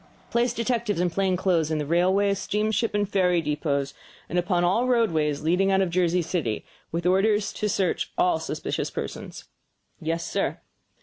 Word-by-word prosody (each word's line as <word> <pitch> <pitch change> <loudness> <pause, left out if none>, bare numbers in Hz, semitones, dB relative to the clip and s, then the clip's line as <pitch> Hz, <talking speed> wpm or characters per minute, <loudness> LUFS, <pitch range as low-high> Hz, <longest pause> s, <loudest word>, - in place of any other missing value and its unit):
"Place 235 0 +2
detectives 230 -4 -1
in 175 -1 +1
plain 190 0 +1
clothes 170 -4 +1
in 155 - 0
the 150 - -2
railway; 185 +5 +3
steamship, 215 +3 -1
and 205 -1 +1
ferry 180 -3 +2
depots, 145 -2 -1 0.4
and 175 - +1
upon 175 0 +1
all 210 +8 +2
roadways 160 - +1
leading 180 +5 +2
out 190 - +3
of 185 -3 0
Jersey 180 0 +2
City, 155 - -2 0.3
with 170 +1 -3
orders 205 +3 +2
to 210 - -2
search 190 -2 0
all 180 -3 +3
suspicious 155 -1 -3
persons." - - -6 0.6
"Yes, 165 +1 -2
sir." - - -1
180 Hz, 165 wpm, -25 LUFS, 165-205 Hz, 0.6 s, railway